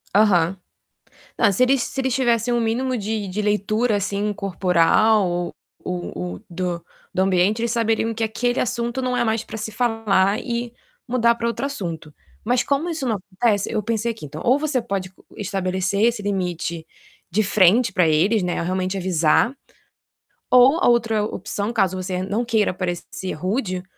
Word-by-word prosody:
Aham. 195 -4 +4 0.8
Não, 205 -4 +4
se 195 - +1
eles 260 0 +3
se 270 - -3
eles 260 -2 0
tivessem 240 -3 +1
o 240 - +1
mínimo 250 +3 0
de 215 -1 -3
de 200 +3 -3
leitura 210 +2 +1
assim 200 +1 -1
corporal 195 +1 +2
ou 175 0 -3 0.3
ou 180 -1 -4
ou 90 +1 -6
do 175 -1 -3 0.3
do - - +1
ambiente, 190 +3 +2
eles 235 0 0
saberiam 225 -1 0
que 225 +1 -1
aquele 245 +3 -1
assunto 240 +1 -2
não 255 0 -1
é - - +2
mais 220 -1 0
pra - - -8
se 215 0 -4
falar 215 -4 +1
e 235 -1 -3 0.3
mudar 235 -2 +3
pra 235 0 -3
outro 235 +4 -1
assunto. 170 - -5 0.3
Mas 245 +2 +2
como 285 +4 0
isso 315 -5 -3
não 225 -3 +1
acontece, 200 +2 -1
eu 215 -2 0
pensei 230 +2 -1
aqui: 220 - -11
"Então, 150 +2 -8
ou 255 +4 +4
você 290 -4 0
pode 195 -4 -4 0.2
estabelecer 190 0 -1
esse 230 -2 +2
limite 175 -4 -3 0.4
de 210 +5 +2
frente 205 +3 +4
pra 180 -3 +3
eles, 185 +8 +3
né, 180 -1 -1
realmente 185 +2 -1
avisar, 180 - +2 1.0
ou 255 +5 +6
a - - +3
outra 225 -3 +2
opção, 210 +1 -3
caso 195 -5 +1
você 185 0 -3
não 205 +5 -1
queira 220 -4 +1
parecer 175 0 -4
rude, 185 - -2
210 Hz, 170 wpm, -22 LUFS, 185-235 Hz, 1.0 s, ou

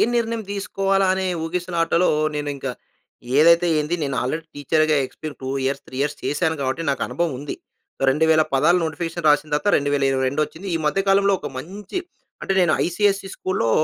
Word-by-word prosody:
నిర్ణయం 230 -1 0
దీసుకోవాలా 195 -1 0
అనే 190 0 -1 0.2
ఊగిసిలాటలో, 175 0 +1 0.3
నేను 145 0 -2
ఇంక 135 -1 -5 0.7
ఏదైతే 170 +3 +6
ఏంది 150 +3 -1
నేను 140 -2 -2
ఆల్రెడీ 155 +6 -3
టీచర్‌గా 155 +2 +2
ఎక్స్‌పీ‌ర్ 155 +3 -8
2 130 - -4 0.2
ఇయర్స్, 135 +1 -2
3 - - -11
ఇయర్స్ 145 +1 -1
చేశాను 160 +2 0
గాబట్టి, 130 +5 -1
నాకు 140 - -1
అనుభవం 170 -3 -1
ఉంది. 145 +1 -5 0.5
2000ల 155 +3 +4
పదాలు 160 +7 +4
నోటిఫికేషన్ 165 +1 -2
రాసిన 150 +1 +2
తర్వాత 150 +8 +1
2022 140 0 +1
వచ్చింది. 185 +6 -11
ఈ - - +2
మధ్య 150 +6 +2
కాలంలో 200 0 +4
ఒక - - -5
మంచి 195 - -6 0.4
అంటే 195 - -1
నేను 170 -3 +3
ఐసిఎస్‌సి 195 +2 0
స్కూల్‌లో 185 -11 -1
160 Hz, 160 wpm, -22 LUFS, 145-185 Hz, 0.7 s, ఏదైతే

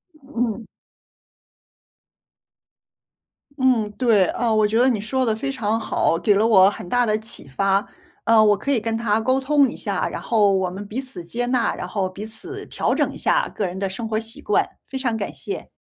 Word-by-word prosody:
嗯。 245 -6 -4 2.9
嗯， 255 -6 +2
对， 225 -7 +4
呃， 235 -2 0
我 215 -1 +3
觉 220 +2 0
得 250 +2 +5
你 230 -5 0
说 260 +5 -1
得 220 -2 +1
非 275 +5 -3
常 225 -3 -1
好， 215 - +1
给 200 +4 +3
了 210 +3 +3
我 195 -4 +6
很 190 - -8
大 245 +3 +2
的 215 -1 +1
启 220 -8 -5
发。 195 +9 +1 0.4
呃， 225 -1 +6
我 210 -1 +4
可 240 - -5
以 260 - +3
跟 225 +1 -2
他 225 -1 +1
沟 260 +3 +2
通 275 -1 +3
一 - - -8
下， - - -2
然 - - -6
后 210 -4 +3
我 190 -1 +1
们 195 +3 -7
彼 235 +6 -4
此 255 -9 -6
接 235 +8 -3
纳， 250 -2 +1
然 - - -6
后 190 -3 -2
彼 195 +3 -8
此 365 - -5
调 - - -1
整 - - +1
一 - - -10
下 - - +1
个 205 - -3
人 185 +1 -5
的 195 -1 -1
生 225 +4 -5
活 215 -1 -1
习 225 0 -7
惯， 420 - +1 0.2
非 270 - -6
常 245 -4 -1
感 215 - -4
谢。 - - -6
225 Hz, 220 characters per minute, -22 LUFS, 205-250 Hz, 2.9 s, 我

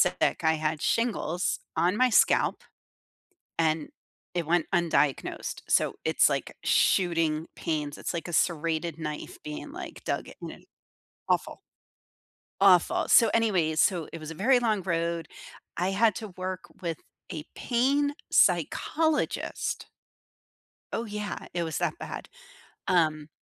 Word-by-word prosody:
sick. - - +2
I 160 0 +3
had 155 0 -2
shingles 205 -7 0 0.2
on 180 +4 +2
my 255 +2 +4
scalp, - - +3 1.0
and 160 -2 +1 0.4
it 170 -3 -1
went 170 0 +2
undiagnosed. 165 -5 0
So - - +2
it's - - +4
like - - -3
shooting 165 -3 +2
pains. 150 -3 -3
It's - - -4
like 170 +1 -4
a - - -5
serrated 165 -1 0
knife 150 -2 -6
being, 150 0 -7
like, - - -8
dug - - -2
in - - -9 0.6
Awful. - - 0 1.0
Awful. 185 -3 +5
So, 230 -2 +6
anyways, 180 -9 +2
so 175 -5 +2
it 165 - -7
was 155 - -7
a 165 - -6
very 245 +9 +4
long 220 -5 +1
road. 170 -2 -1 0.5
I 180 +2 0
had 215 +3 +3
to 215 - -5
work 185 0 -5 0.2
with 170 -4 -3 0.3
a 155 -3 -5
pain 275 +4 +1 0.2
psychologist. 315 -1 +1 1.1
Oh, 230 - -2
yeah. 210 -1 -4 0.2
It 175 - 0
was 160 -2 -2
that - - -1
bad. 65 -2 -7 0.6
Um, 155 -4 +2
170 Hz, 130 wpm, -28 LUFS, 160-205 Hz, 1.1 s, So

